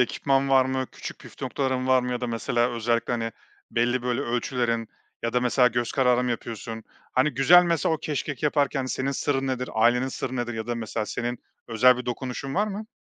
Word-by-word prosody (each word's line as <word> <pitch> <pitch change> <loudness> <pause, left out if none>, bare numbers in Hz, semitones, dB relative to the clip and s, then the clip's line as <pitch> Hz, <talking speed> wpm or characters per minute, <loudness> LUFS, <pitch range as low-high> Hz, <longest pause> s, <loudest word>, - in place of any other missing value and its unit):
ekipman 135 +2 +1
var 135 -1 +5
mı? 130 0 -1
Küçük - - -8
püf - - -14
noktaların 130 -2 -1
var 130 -1 +4
mı? 125 - -3
Ya 125 - -2
da 125 - -2
mesela 120 +1 0
özellikle, 115 0 0
hani, 115 -2 -2 0.4
belli 120 +1 +1
böyle 125 -1 -1
ölçülerin 120 -1 -1 0.3
ya 115 - -1
da 125 - +2
mesela 125 +1 +4
göz 120 0 -2
kararı 125 -2 +3
mı 125 - -1
yapıyorsun? 115 -1 -5 0.3
Hani, 130 +4 +3
güzel 145 +7 +6
mesela 165 -1 +1
o - - -4
keşkek 145 -1 -4
yaparken 145 -2 +1
senin 130 +2 -1
sırrın 135 -1 -1
nedir? 125 -1 -2
Ailenin 120 +3 +3
sırrı 130 0 -4
nedir? 120 -1 -2
Ya 110 0 -4
da 120 - -1
mesela 110 -1 -3
senin 120 +1 -3 0.3
özel 125 +2 +5
bir 125 - -6
dokunuşun 130 +2 -4
var 210 +3 +2
mı? 210 +1 -5
125 Hz, 205 wpm, -25 LUFS, 120-135 Hz, 0.4 s, güzel